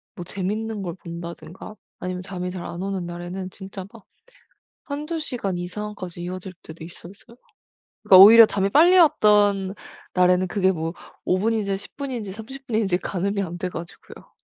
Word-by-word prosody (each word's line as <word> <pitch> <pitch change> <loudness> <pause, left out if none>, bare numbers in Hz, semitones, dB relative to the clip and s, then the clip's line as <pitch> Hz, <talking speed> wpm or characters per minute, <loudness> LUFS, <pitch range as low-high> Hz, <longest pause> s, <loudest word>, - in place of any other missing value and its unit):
뭐 175 - -7
재밌는 210 +3 -3
걸 170 -2 -4
본다든가 170 +3 -9 0.2
아니면 180 0 -4
잠이 180 -1 -5
잘 180 -2 -6
안 175 - -6
오는 195 -3 -3
날에는 175 +2 -6
진짜 190 0 -9
막 230 -4 -16 0.8
1-2 300 +3 -4
시간 215 - -3
이상까지 185 -1 -6
이어질 185 +1 -6
때도 160 0 -11
있었어요. 195 +7 -13 0.7
그러니까 185 - +7
오히려 225 +2 +10
잠이 200 -1 -1
빨리 345 - +6
왔던 205 - +4 0.4
날에는 180 0 +3
그게 190 0 +2
뭐 165 -1 -3 0.3
5 185 - +2
분인지 210 -2 0
10 - - -8
분인지 250 -8 -4
30 265 +5 -10
분인지 215 -6 +1
가늠이 200 +2 -2
안 175 -2 -5
돼 180 +1 -3
가지고요. 170 0 -11
195 Hz, 315 characters per minute, -23 LUFS, 180-215 Hz, 0.8 s, 오히려